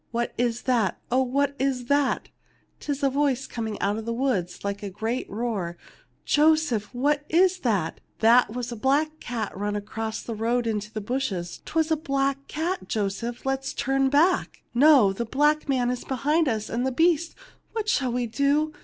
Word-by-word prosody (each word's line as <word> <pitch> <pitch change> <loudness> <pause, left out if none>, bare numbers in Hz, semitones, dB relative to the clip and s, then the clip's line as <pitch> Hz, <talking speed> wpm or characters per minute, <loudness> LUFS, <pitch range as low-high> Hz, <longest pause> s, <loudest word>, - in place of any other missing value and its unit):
What 235 +1 -2
is 240 0 -1
that? 235 -8 +1
Oh, 255 +2 +4
what 280 +2 +1
is 260 -2 0
that? 285 +1 +1 0.5
'Tis 285 -1 -4
a 275 - +4
voice 275 -2 +1
coming 220 -3 -4
out 205 +2 0
of 220 - -7
the 230 - -2
woods 230 -9 -1
like 200 +1 -3
a 205 - -4
great 220 +6 -3
roar. 200 -6 -3 0.5
Joseph 300 -8 +2
1 250 +1 -6
What 295 0 +2
is 370 +3 +3
that? 200 - -1 0.2
That 230 0 +5
was 245 +1 -4
a - - -4
black 295 +6 +1
cat 225 -4 -4
run 205 +2 -2
across 220 +2 -4
the 230 - -5
road 230 +2 0
into 210 -2 -2
the 220 -1 -4
bushes. 205 -7 -3
'Twas 320 0 0
a 315 - +3
black 275 -2 -1
cat. 340 +5 -3
Joseph, 220 +3 -3
let 270 0 +1
us 270 - -5
turn 270 +1 +1
back! 325 +7 +2
No; 255 -6 +6
the 235 - -3
black 295 +5 +1
man 250 -2 +2
is 250 - -4
behind 295 +5 +1
us, 215 -3 -2
and 235 +2 -2
the 265 - 0
beast. 330 +3 +2 0.4
What 440 -2 -2
shall 265 - +1
we 245 0 -1
do 285 +6 +1
250 Hz, 190 wpm, -25 LUFS, 225-285 Hz, 0.5 s, No